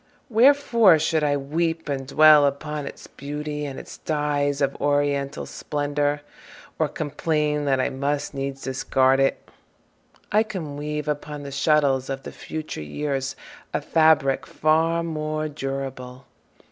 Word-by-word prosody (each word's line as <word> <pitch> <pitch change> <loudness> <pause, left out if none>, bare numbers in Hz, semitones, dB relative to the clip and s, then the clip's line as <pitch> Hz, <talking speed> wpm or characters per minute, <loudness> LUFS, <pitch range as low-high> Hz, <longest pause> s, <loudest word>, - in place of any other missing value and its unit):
Wherefore 235 - +5
should 160 0 +1
I 145 -1 +2
weep 160 +4 -2
And 135 -2 -3
dwell 150 0 +7
upon 145 +1 -4
its - - -9
beauty, 150 +1 -5
and 135 -2 -6
its - - -11
dyes 145 -2 0
Of 140 -1 0
oriental 145 0 0
splendor, 145 0 -2 0.6
or - - +3
complain 150 -1 -1
That 135 -2 +2
I - - 0
must 140 +2 -2
needs 135 0 -4
discard 130 0 +2
it? 135 0 0 0.8
I 210 - +4
can 180 -10 -5
weave 150 +1 -4
Upon 150 0 -4
the 140 - -7
shuttles 140 -2 +2
of 135 0 -4
the - - -7
future 155 - -6
years 135 - -3 0.4
A - - +2
fabric 155 -4 +3
far 165 +2 +2
more 155 -1 -2
durable. 135 -3 -6
145 Hz, 135 wpm, -24 LUFS, 140-155 Hz, 0.8 s, dwell